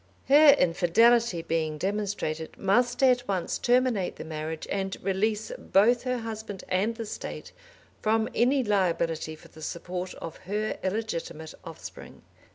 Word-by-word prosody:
Her 290 0 +8
infidelity 185 +3 +3
being 160 -2 -1
demonstrated, 190 -4 -3
must 240 +7 +2
at 250 -1 +4
once 185 -3 -1
terminate 245 -6 +2
the - - -7
marriage 155 0 -5
and 195 -1 -2
release 210 +3 0
both 230 +5 +3
her 250 0 0
husband 220 -4 -6
and 200 +5 +1
the 225 -1 -5
State - - -7 0.5
from 220 +1 +2
any 260 +3 +3
liability 170 -6 0
for - - -17
the 160 - -14
support 180 +3 -5
of 165 - -8
her 215 +1 -1
illegitimate 185 -6 -3
offspring. 165 -3 -10
200 Hz, 135 wpm, -27 LUFS, 170-230 Hz, 0.5 s, Her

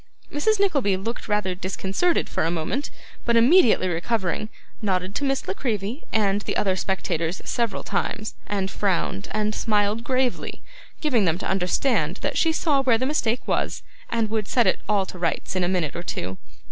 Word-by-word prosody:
Mrs. 425 +8 +2
Nickleby 280 - +2
looked 225 +6 -4
rather 210 -3 +1
disconcerted 190 - 0
for - - -1
a 165 - +2
moment, 175 - -2 0.3
but 235 - +2
immediately 235 - +6
recovering, 185 +3 -1 0.3
nodded 190 -2 0
to 285 - -2
Miss 270 -1 0
La 185 - 0
Creevy 220 - -2
and 205 -2 +2
the - - -2
other 190 -2 +2
spectators 180 -3 -1
several 235 -5 -1
times, 215 0 -2
and 195 -2 -1
frowned, 180 - -1
and 215 0 0
smiled 210 0 +1
gravely, 255 0 -1 0.4
giving 250 -10 +3
them 165 -1 +2
to - - -4
understand 185 - +1
that - - -1
she 325 - +3
saw 305 -3 +2
where 250 -4 +4
the 255 - -1
mistake 250 -5 0
was, - - -1 0.3
and 225 -2 0
would 215 -2 -1
set 240 -2 +3
it - - +2
all 200 -2 +3
to 185 - -9
rights 170 +2 -1
in 185 - +1
a - - +2
minute 175 -6 0
or 170 - -3
two. 95 - -4
210 Hz, 180 wpm, -24 LUFS, 185-245 Hz, 0.4 s, immediately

